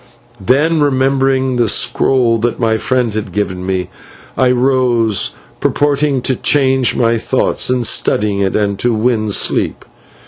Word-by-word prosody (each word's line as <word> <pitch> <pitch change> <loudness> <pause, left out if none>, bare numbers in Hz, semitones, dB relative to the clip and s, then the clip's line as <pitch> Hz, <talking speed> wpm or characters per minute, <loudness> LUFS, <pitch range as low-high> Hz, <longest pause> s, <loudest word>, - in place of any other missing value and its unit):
Then, 150 - +2
remembering 135 -2 +1
the 120 -1 +2
scroll 120 +1 +1
that 115 +1 -2
my 115 -2 +1
friend 125 0 -1
had 110 0 -4
given 95 -3 -3
me, 90 -1 -3 0.5
I 130 - +2
rose, 125 -4 +1 0.2
purposing 145 -2 0
to 130 - 0
change 130 -1 +1
my 115 -1 +1
thoughts 130 +2 0
in 125 -1 0
studying 105 -2 0
it 95 -1 -1
and 100 -2 -1
so 120 -1 +1
win 110 -1 0
sleep. 100 - -1
120 Hz, 140 wpm, -14 LUFS, 110-130 Hz, 0.5 s, Then